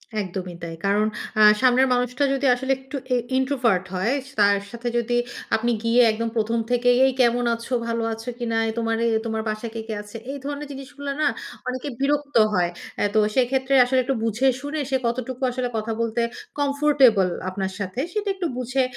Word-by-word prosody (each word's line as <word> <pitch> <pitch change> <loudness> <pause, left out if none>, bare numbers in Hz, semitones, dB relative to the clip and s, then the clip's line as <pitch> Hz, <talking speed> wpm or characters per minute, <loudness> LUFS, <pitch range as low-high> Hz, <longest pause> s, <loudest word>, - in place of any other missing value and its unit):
একদমই 185 -3 -4
তাই। 165 -1 -5
কারণ 205 +2 +3 0.3
আ - - +6 0.2
সামনের 255 +1 +5
মানুষটা 250 +2 0
যদি 275 0 -1
আসলে 265 +2 -2
একটু 265 +2 -10 0.2
এ - - +4 0.2
ইন্ট্রোভার্ট 255 -8 +1
হয়, 190 +8 +1
স - - -12
তার 200 0 +5
সাথে 240 0 -6
যদি 240 +1 0 0.4
আপনি 235 +2 0
গিয়ে 230 +2 +4
একদম 230 +1 -2
১ম 230 +1 +1
থেকেই, 245 0 +3
"এই 265 - +2
কেমন 240 0 +3
আছো? 230 +2 -7
ভালো 230 0 -1
আছো 225 +2 -7
কিনা? 230 -2 -1 0.2
তোমার 225 -1 0
এ - - +3 0.2
তোমার 220 -1 -2
বাসায় 215 +1 -4
কে, 225 - -3
কে 220 - -3
আছে?" 210 +2 -9
এই 285 - -5
ধরনের 290 0 -4
জিনিসগুলা 280 +1 -7
না? - - +4 0.4
অনেকে 255 +2 -3
বিরক্ত 290 +1 0 0.2
হয়। 175 -2 +2 0.3
এ - - +4
তো 215 - +4 0.2
সেক্ষেত্রে 265 +1 +1
আসলে 260 +1 +2
একটু 270 +2 -1
বুঝে-শুনে, 265 +6 0
সে 265 - +2
কতটুকু 255 +2 -3
আসলে 250 0 -2
কথা 220 +1 -2
বলতে 230 +1 0 0.4
কমফোর্টেবল 280 -8 +4 0.2
আপনার 190 0 -3
সাথে, 195 +3 -4
সেটা 420 -1 -1
একটু 365 -3 -2
বুঝে, 255 +1 0
245 Hz, 185 wpm, -23 LUFS, 225-265 Hz, 0.4 s, আ